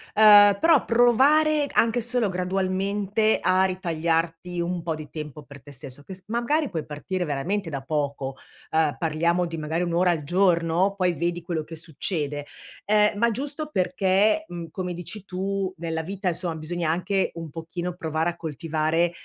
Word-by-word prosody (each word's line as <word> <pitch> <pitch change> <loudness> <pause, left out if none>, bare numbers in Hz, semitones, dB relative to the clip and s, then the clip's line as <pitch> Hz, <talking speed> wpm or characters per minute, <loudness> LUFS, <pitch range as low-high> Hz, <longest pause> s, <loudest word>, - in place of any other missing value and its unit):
Ehm, 205 -1 +8
però 325 -4 +4
provare 285 +6 +4
anche 230 +1 +3
solo 240 -2 0
gradualmente, 195 +3 0
a 185 +1 +3
ritagliarti 170 -1 -1
un 175 0 -2
po' 160 -1 -2
di 155 -1 -9
tempo 150 -2 -7
per 140 -1 -13
te 145 - -13
stesso, 130 +1 -9
che 190 - -9
s 185 - -11
magari 240 +7 0
puoi 160 -5 -4
partire 175 +5 -4
veramente 165 +6 -2
da 140 -3 -4
poco. 140 -2 -3 0.3
Ehm, 155 -4 +2
parliamo 170 +2 +1
di 165 -1 -5
magari 160 +3 -2
1 170 -1 -2
ora 175 +1 +3
al 155 -3 -2
giorno 175 +2 +2
poi 180 -2 +1
vedi 175 +1 -2
quello 165 -2 -3
che 165 +2 -9
succede. 150 -2 -2 0.4
Ehm, 210 0 +3
ma 235 - +4
giusto 285 +6 -4
perché, 190 - +2
mhmm, 170 -2 -7
come 180 -2 -4
dici 180 +4 -7
tu, 195 0 -2
nella 165 -1 -3
vita 190 +3 -3
insomma, 170 -1 -2
bisogna 165 +1 -3
anche 185 +4 0
un 165 -2 -6
pochino 170 +3 -5
provare 160 -1 -1
a 170 - -5
coltivare 160 +2 -1
175 Hz, 170 wpm, -25 LUFS, 160-200 Hz, 0.4 s, Ehm